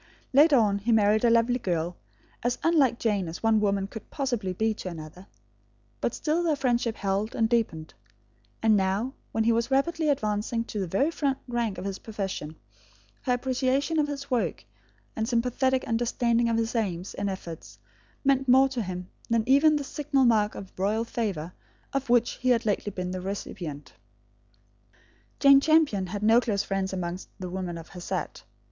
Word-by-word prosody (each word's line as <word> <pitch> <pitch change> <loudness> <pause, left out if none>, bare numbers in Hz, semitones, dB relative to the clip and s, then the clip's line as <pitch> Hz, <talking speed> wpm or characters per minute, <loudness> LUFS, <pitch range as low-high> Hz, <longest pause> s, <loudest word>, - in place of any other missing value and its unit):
Later 290 +2 +6
on 210 -5 +3
he 225 +4 -1
married 215 0 +4
a 240 - +5
lovely 235 +2 +3
girl, 175 -3 -2 0.5
as 245 +1 0
unlike 285 -8 +3
Jane 205 -6 0
as 165 +6 -7
one 225 -1 +4
woman 200 -2 +1
could 215 +2 -10
possibly 245 -9 -2
be 220 +4 0
to 190 - -6
another; 165 +3 -10 0.7
but - - -1
still 315 +3 0
their 330 -3 +1
friendship 240 -4 0
held 200 +2 -2
and 225 - +2
deepened; 215 -10 -1 0.7
and 220 -1 +5
now, 200 +6 0 0.2
when 225 - +1
he 230 - +3
was 230 +2 +1
rapidly 310 +4 +1
advancing 220 -3 0
to 220 -2 -5
the 190 - -2
very 270 - +1
front 280 -4 -1
rank 235 -5 -1
of - - -6
his 195 -1 -4
profession, 195 -8 -5 0.7
her 250 - 0
appreciation 265 +5 0
of 295 - +2
his 280 -1 -6
work, 245 -2 -1 0.5
and 220 +1 -2
sympathetic 255 +2 +1
understanding 235 0 +1
of 230 - +1
his 225 0 -1
aims 190 -6 -2
and 200 0 -2
efforts, 170 -4 -8 0.5
meant 270 -1 +3
more 265 +2 +6
to 255 -3 -3
him 180 -2 -5 0.2
than 230 -1 +2
even 290 +4 +5
the 290 - -1
signal 280 -1 0
mark 215 -3 +3
of 190 - -9
royal 210 +4 +1
favour, 190 -9 -3 0.4
of 275 -2 -2
which 240 -2 +3
he 255 - +1
had 235 -2 +3
lately 205 -1 0
been 180 -1 -4
the 185 0 -4
recipient. 175 - -6 1.5
Jane 275 -1 +7
Champion 300 - +3
had 205 +3 -5
no 225 +3 +5
close 205 -4 0
friends 195 -1 -2
amongst 180 -1 -4
the 180 -1 -5
women 180 -2 -4
of 165 - -10
her 180 - -10
set. - - -4
225 Hz, 180 wpm, -27 LUFS, 195-255 Hz, 1.5 s, Jane